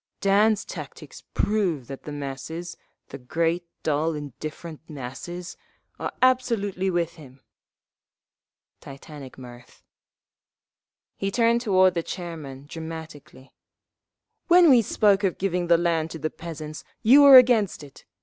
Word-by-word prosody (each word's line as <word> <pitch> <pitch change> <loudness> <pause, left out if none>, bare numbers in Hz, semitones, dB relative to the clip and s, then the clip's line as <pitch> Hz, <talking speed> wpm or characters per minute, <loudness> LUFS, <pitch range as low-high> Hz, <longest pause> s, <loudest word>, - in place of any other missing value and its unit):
"Dan's 205 +2 +2
tactics - - -10
prove 185 - 0
that 135 +2 -10
the 150 - -6
masses—the 145 +2 -8
great, 165 +6 -1 0.2
dull, 155 +1 0
indifferent 150 +3 -8
masses—are 155 +6 -8
absolutely 225 -7 +1
with 175 -2 -2
him!" 135 -4 -15 1.4
(Titantic 140 0 -11
mirth.) 120 -1 -14 1.3
He 195 - -2
turned 235 +2 +2
toward 190 -5 +3
the 170 - -1
chairman, 155 -7 -8
dramatically. 160 -4 -10 0.9
"When 345 -3 +6
we 245 -3 +6
spoke 205 -1 +2
of 190 -3 0
giving 180 -2 -1
the 170 0 +5
land 165 -2 0
to 165 - -7
the 155 0 -3
peasants, 155 -2 -8 0.2
you 260 +6 +7
were 280 -2 +10
against 230 -10 +4
it. 140 - -15
170 Hz, 115 wpm, -24 LUFS, 150-200 Hz, 1.4 s, were